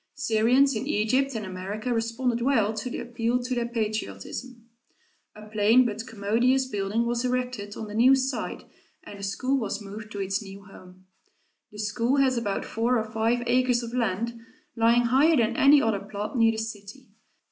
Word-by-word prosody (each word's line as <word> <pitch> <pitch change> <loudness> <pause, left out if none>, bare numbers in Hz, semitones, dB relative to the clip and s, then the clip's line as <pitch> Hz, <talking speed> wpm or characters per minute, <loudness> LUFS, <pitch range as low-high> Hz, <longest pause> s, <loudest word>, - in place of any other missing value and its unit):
Syrians 255 +1 +3
in 230 +5 -3
Egypt 260 +2 +1
and 215 -2 -3
America 195 +6 -4
responded 230 +1 -1
well 230 -5 +2
to 220 +3 -4
the - - -5
appeal 240 0 -1
to 250 +1 -3
their 240 -1 -1
patriotism. 225 - -5 0.7
A 215 0 -11
plain 215 +4 +4
but 225 +1 -4
commodious 230 +5 +1
building 210 -1 -1
was 235 +1 -1
erected 250 -5 -3
on 220 - -5
the 210 - -8
new 250 +5 +6
site 265 0 -3 0.4
and 205 - -11
the - - -9
school 255 +8 0
was 205 -3 -3
moved 210 +1 -9
to 205 - -5
its 195 +1 -1
new 200 -1 -11
home. 185 -1 -16 0.7
The 210 - -13
school 230 +5 0
has 265 -2 +3
about 220 -4 -2
four 235 +3 0
or 220 -1 -3
five 225 +2 0
acres 245 0 +2
of 235 0 -7
land, 235 0 -1 0.4
lying 235 +1 +4
higher 270 +7 +4
than 235 -1 +1
any 280 +3 +6
other 220 -3 +1
plot 205 +3 -6
near 230 -2 +4
the - - -5
city. 220 +3 -7
230 Hz, 180 wpm, -26 LUFS, 210-250 Hz, 0.7 s, new